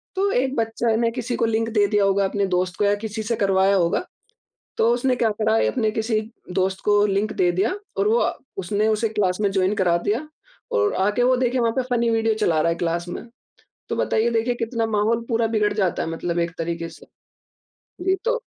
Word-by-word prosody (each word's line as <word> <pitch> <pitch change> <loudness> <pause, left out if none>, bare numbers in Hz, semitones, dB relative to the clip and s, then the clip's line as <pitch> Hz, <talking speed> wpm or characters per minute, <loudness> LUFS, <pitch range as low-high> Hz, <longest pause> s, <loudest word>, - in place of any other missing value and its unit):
तो 395 +1 +1
एक 265 -2 0
बच्चा 225 0 0
ने 230 0 +1
किसी 245 0 -3
को 230 - +1
लिंक 225 0 0
दे 210 -2 +4
दिया 205 0 +2
होगा 195 0 +2
अपने 200 +1 0
दोस्त 180 0 -1
को - - 0
या 200 - +3
किसी 220 0 -4
से 230 +2 -1
करवाया 195 0 +3
होगा। 175 - +1 0.7
तो 225 - +3
उसने 250 +1 +1
क्या 230 - +2
करा, 220 +1 +1
एक - - +2
अपने 225 -4 0
किसी 220 0 0 0.3
दोस्त 190 +1 0
को 205 0 +4
लिंक 200 +2 0
दे 180 -1 +2
दिया 190 - 0 0.2
और 195 +1 +2
वो 225 +2 +3
अ, - - 0 0.2
उसने 205 +3 0
उसे 220 +1 +1
क्लास 195 -4 0
में 205 - +2
जॉइन 190 0 +1
करा 180 -4 +2
दिया 220 - -2 0.4
और 430 -3 +2
आके 205 +5 +1
वो, 255 +1 +4
देखिए, 250 0 +1
वहाँ 230 -1 +1
पे - - +3
फनी 235 0 +1
वीडियो 225 0 +2
चला 175 -7 +1
रहा 170 - +2
है - - -1
क्लास 170 +1 -2
में। - - -6 0.7
तो - - -1
बताइए, 220 +2 +1
देखिए 230 +2 +1
कितना 230 -1 -2
माहौल 220 +2 +1
पूरा 230 -1 +1
बिगड़ 215 -2 +1
जाता 195 -5 0
है, - - -4
मतलब 170 +1 -2
एक 170 0 -1
तरीके 165 0 -3
से। 165 - -15 1.0
जी, 380 0 +3
तो 485 0 0
215 Hz, 220 wpm, -22 LUFS, 190-230 Hz, 1.0 s, दे